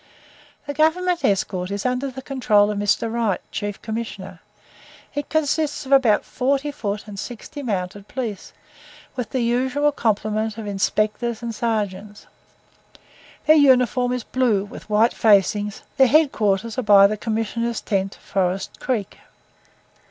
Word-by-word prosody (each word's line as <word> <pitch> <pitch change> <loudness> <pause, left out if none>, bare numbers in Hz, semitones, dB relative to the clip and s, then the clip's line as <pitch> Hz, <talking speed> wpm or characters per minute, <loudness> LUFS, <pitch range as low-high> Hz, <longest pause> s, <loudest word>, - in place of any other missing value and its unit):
The 285 - -4
Government 345 +4 +1
escort 185 -2 0
is 200 0 -4
under 250 +2 0
the 265 0 -9
control 215 -7 +2
of 205 - -3
Mr. 205 +2 0
Wright, 225 -5 0
Chief 205 -1 -4
Commissioner; 205 -5 -6 0.7
it 290 0 -4
consists 310 -1 0
of 265 - -8
about 250 -6 +4
forty 275 +3 -1
foot 210 -6 -4
and 200 -2 -8
sixty 245 +6 -7
mounted 200 -4 -4
police, 235 -6 -5 0.6
with 250 -4 -4
the 260 - -1
usual 260 +5 +1
complement 215 -3 -1
of 220 - -6
inspectors 215 +3 -1
and 230 -1 -3
sergeants; 210 -2 -3 1.2
their 310 - +6
uniform 250 -3 +4
is 250 -2 -2
blue 230 -7 +1
with 205 - -12
white 215 +3 +3
facings, 205 -1 +2
their 265 0 +6
head 300 +2 +4
quarters 215 +3 0
are - - +1
by 205 -3 +7
the 210 +2 +2
Commissioners' 225 +2 -2
tent, 195 -2 -2
Forest 190 0 -2
Creek. 225 -7 -3
225 Hz, 140 wpm, -22 LUFS, 205-260 Hz, 1.2 s, by